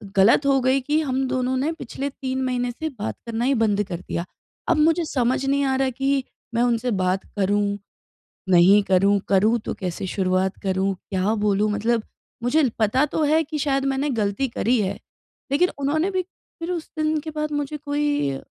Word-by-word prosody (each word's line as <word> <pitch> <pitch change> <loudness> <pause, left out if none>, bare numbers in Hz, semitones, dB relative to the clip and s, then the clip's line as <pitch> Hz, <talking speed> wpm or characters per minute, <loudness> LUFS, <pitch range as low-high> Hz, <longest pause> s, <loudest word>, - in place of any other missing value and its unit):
गलत 220 +9 +5
हो 275 -1 +4
गई 260 +2 +3
कि 295 +4 +1
हम 265 -2 -1
दोनों 255 0 0
ने 285 +5 0
पिछले 275 0 -5
3 260 -1 -4
महीने 245 -1 -1
से 315 +6 -4
बात 210 - -3
करना 230 +1 -2
ही 275 - +3
बंद 210 -2 +2
कर 175 -3 -6
दिया। 170 - -4 0.4
अब 335 - +3
मुझे 325 +2 +3
समझ 260 -1 0
नहीं 280 +1 +1
आ 265 - +1
रहा 265 0 +1
कि 270 +1 0 0.3
मैं 235 - +3
उनसे 240 0 +1
बात 185 +1 0
करूँ, 200 +1 +1 0.7
नहीं 185 +3 +6
करूँ? 195 +1 +3
करूँ 215 +4 +3
तो - - -2
कैसे 180 +1 -3
शुरुआत 185 0 0
करूँ, 190 0 0 0.2
क्या 190 +2 +1
बोलूँ? 210 +1 +2
मतलब 225 +2 0 0.4
मुझे 275 +3 +3
पता 225 +7 +3
तो 310 +2 -1
है 310 +2 +3
कि 310 +1 -5
शायद 275 -1 +1
मैंने 275 +2 -1
गलती 205 +6 0
करी 245 +1 +2
है, 190 - -2 0.5
लेकिन 355 +6 +3
उन्होंने 310 +7 0
भी 370 -1 0
फिर 345 -1 -9
उस 335 -3 -4
दिन 310 0 +1
के 315 +2 -7
बाद 305 0 -3
मुझे 290 +1 -4
कोई 290 - 0
अ, 135 - -5
255 Hz, 190 wpm, -23 LUFS, 205-290 Hz, 0.7 s, नहीं